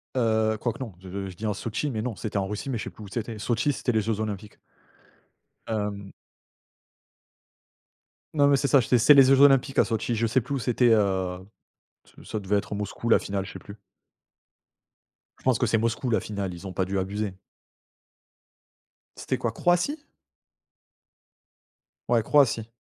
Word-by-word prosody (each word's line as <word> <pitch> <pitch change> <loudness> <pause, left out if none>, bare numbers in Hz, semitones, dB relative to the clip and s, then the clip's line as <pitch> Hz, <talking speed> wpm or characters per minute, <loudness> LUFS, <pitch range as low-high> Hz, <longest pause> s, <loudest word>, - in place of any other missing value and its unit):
Heu, 110 -2 +1
quoi 120 - -1
que - - -14
non. 115 -8 -6
Je 95 +1 -6
je 90 - -10
dis 110 - -6
en 105 - 0
Sotchi 115 +8 -3
mais 110 -3 -3
non, 115 -2 -3
c'était 105 +2 -4
en 95 - 0
Russie 105 +7 -5
mais 125 - -1
je - - -5
sais - - -5
plus 110 - -13
où - - -9
c'était. 110 +2 -5
Sotchi 120 +6 0
c'était 125 - -1
les 110 -2 +1
Jeux 110 0 -2
Olympiques. 105 -1 -5 1.1
Hem 105 -2 -3 2.2
Non 145 -2 +4
mais 140 -1 +4
c'est 140 - 0
ça 140 - +5
ché 125 0 +2
c'est 145 +6 +7
les 135 - +9
Jeux 135 +1 +5
Olympiques 135 -1 +5
à - - +5
Sotchi. 115 +1 -2
Je 115 +1 +1
sais 120 +4 +2
plus 135 +5 -6
où 135 - -2
c'était, 125 0 +2
heu, 95 -3 +1 0.7
ç - - -17
ça 110 - -4
devait 100 +1 0
être 100 - -3
Moscou 105 +3 -4
la - - +7
finale, 100 -1 -3
je 100 - -9
sais - - -8
plus. 100 - -12 1.6
Je - - -24
pense 130 -4 +2
que 125 - +2
c'est 115 - +2
Moscou 115 +3 -1
la 110 - +2
finale. 100 -3 -4
Ils 85 +3 -11
ont 95 - -7
pas 95 - 0
dû 95 +1 -3
abuser. 100 +1 -3 1.8
C'était - - -2
quoi? 115 - -2
Croatie? 175 - 0 2.0
Ouais, 115 -2 +3
Croatie. 115 -5 +3
110 Hz, 185 wpm, -26 LUFS, 100-125 Hz, 2.2 s, les